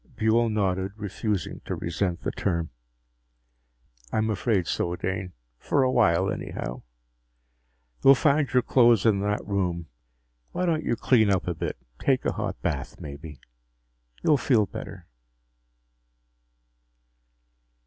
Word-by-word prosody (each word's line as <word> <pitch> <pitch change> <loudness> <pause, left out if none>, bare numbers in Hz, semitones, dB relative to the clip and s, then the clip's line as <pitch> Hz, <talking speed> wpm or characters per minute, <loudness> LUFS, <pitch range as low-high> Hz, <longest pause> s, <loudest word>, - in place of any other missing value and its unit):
Buehl 115 +1 +3
nodded, 95 -2 0
refusing 105 -2 -3
to - - -3
resent 85 +1 -2
the - - -2
term. 85 -4 -2 1.4
"I'm 110 0 +1
afraid 100 -3 +1
so, 85 +1 -1
Dane 95 0 -4 0.3
for 140 - +1
a 130 - +2
while, 95 -6 +3
anyhow. - - -5 1.2
You'll 135 - +8
find 140 +1 +2
your 125 -1 +3
clothes 120 -5 +4
in 105 -3 +4
that 105 +1 -1
room. 90 -5 -2 0.6
Why 180 - -1
don't 160 -2 +1
you - - 0
clean 115 -3 +3
up 95 -3 +1
a 90 - -1
little? 80 - -4 0.2
Take 130 -2 +1
a - - +1
hot 105 -3 -4
bath, 70 -6 -3
maybe. 75 0 -9 0.8
You'll 150 - +4
feel 120 -6 +3
better." - - -8
100 Hz, 125 wpm, -26 LUFS, 90-120 Hz, 1.4 s, You'll